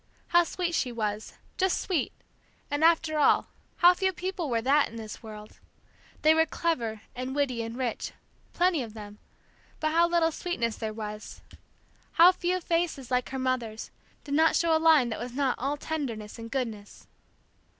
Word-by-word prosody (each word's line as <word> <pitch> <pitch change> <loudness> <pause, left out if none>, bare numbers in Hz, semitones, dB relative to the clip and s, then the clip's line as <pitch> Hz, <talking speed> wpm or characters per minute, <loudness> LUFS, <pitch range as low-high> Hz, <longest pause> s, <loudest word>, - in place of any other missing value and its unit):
How 345 0 +5
sweet 345 +1 -3
she 255 -6 0
was, 215 -2 -3 0.3
just 380 -1 +2
sweet, 345 -8 -1 0.6
and 290 +2 0
after 325 -2 +3
all, 290 - +4 0.3
how 355 +1 +7
few 380 +1 0
people 365 -3 -4
were 230 -2 +1
that 280 +5 +3
in 230 - -12
this 220 -2 -8
world! 215 -1 -11 0.6
They 310 +1 +7
were 320 0 +3
clever, 235 -12 -2
and 255 +2 -4
witty, 265 -5 0
and 230 +1 -6
rich, 250 -3 -3 0.4
plenty 350 -4 +2
of 225 -3 -7
them, 210 -1 -10 0.6
but 310 0 0
how 335 +2 +4
little 335 -1 +2
sweetness 240 -10 -2
there 220 -1 -3
was! 215 -1 -7 0.7
How 340 +2 +8
few 365 0 -1
faces, 330 -7 -1
like 250 0 +1
her 265 - -4
mother's, 250 -4 -2 0.3
did 285 - -5
not 320 +2 +4
show 330 -1 +3
a 315 - +1
line 310 -7 +5
that 220 - -4
was 240 +1 -6
not 270 -1 +1
all 275 +4 -1
tenderness 245 -9 -5
and 230 0 -7
goodness. 230 -6 -5
275 Hz, 170 wpm, -28 LUFS, 230-330 Hz, 0.7 s, How